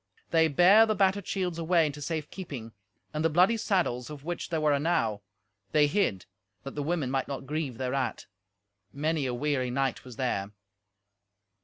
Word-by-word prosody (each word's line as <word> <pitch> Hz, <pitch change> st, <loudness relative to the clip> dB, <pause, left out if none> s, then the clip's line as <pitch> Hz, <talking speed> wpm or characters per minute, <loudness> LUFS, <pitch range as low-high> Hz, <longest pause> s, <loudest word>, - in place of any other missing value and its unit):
They 160 Hz, -1 st, +5 dB
bare 185 Hz, +9 st, +6 dB
the 215 Hz, -, +1 dB
battered 195 Hz, 0 st, +2 dB
shields 180 Hz, -4 st, -2 dB
away 165 Hz, 0 st, +3 dB
into 145 Hz, 0 st, -4 dB
safe 155 Hz, -1 st, -3 dB
keeping; 135 Hz, -, -7 dB, 0.4 s
and 155 Hz, +1 st, -1 dB
the 165 Hz, -, +3 dB
bloody 180 Hz, +8 st, +4 dB
saddles, 175 Hz, -, 0 dB
of 145 Hz, -2 st, -9 dB
which 175 Hz, +2 st, -4 dB
there 165 Hz, -, 0 dB
were 150 Hz, -1 st, +3 dB
enow, 140 Hz, -9 st, 0 dB, 0.5 s
they 150 Hz, -1 st, +5 dB
hid, 145 Hz, -, 0 dB, 0.4 s
that 135 Hz, -, -7 dB
the 145 Hz, -, -3 dB
women 150 Hz, -3 st, -1 dB
might 135 Hz, -1 st, -1 dB
not 135 Hz, -1 st, -5 dB
grieve 145 Hz, -4 st, -3 dB
thereat. 130 Hz, 0 st, -2 dB, 0.7 s
Many 150 Hz, 0 st, -1 dB
a 125 Hz, -, -2 dB
weary 140 Hz, -1 st, 0 dB
knight 135 Hz, 0 st, -1 dB
was 125 Hz, -2 st, -11 dB
there. 105 Hz, -6 st, -2 dB
150 Hz, 170 wpm, -28 LUFS, 130-175 Hz, 0.7 s, bare